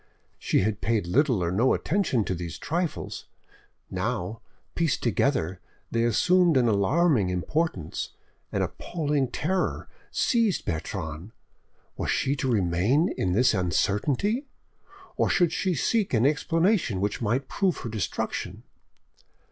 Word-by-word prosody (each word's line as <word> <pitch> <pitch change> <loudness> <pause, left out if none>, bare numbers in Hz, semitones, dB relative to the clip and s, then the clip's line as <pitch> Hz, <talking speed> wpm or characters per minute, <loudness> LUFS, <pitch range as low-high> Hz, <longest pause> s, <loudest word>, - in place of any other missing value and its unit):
She - - +1
had 105 +1 -1
paid 110 -5 +1
little 120 - +2
or 85 - 0
no 115 +8 +3
attention 160 - 0
to 95 - -2
these 85 -2 -5
trifles; 170 +1 -3 0.6
now, 100 +6 -3 0.3
pieced 165 -3 0
together, 110 - 0 0.3
they 115 0 +1
assumed 175 - +4
an 125 -2 +3
alarming 115 - +3
importance. 90 - -2 0.4
An - - 0
appalling 150 -5 -1
terror 180 +9 -1 0.2
seized 230 -6 +1
Bertrande: 80 +2 -4 0.6
was - - -2
she 135 +1 +1
to 130 -1 0
remain 105 - +2
in 90 -1 0
this 125 +5 +4
uncertainty, 130 - 0 0.7
or - - +2
should 175 -3 +3
she 185 -3 0
seek 205 - +1
an 115 +3 +3
explanation 165 - +2
which 100 +4 -1
might 120 +5 0
prove 190 -4 0
her 115 - -5
destruction? 110 -3 -3
125 Hz, 125 wpm, -26 LUFS, -, 0.7 s, assumed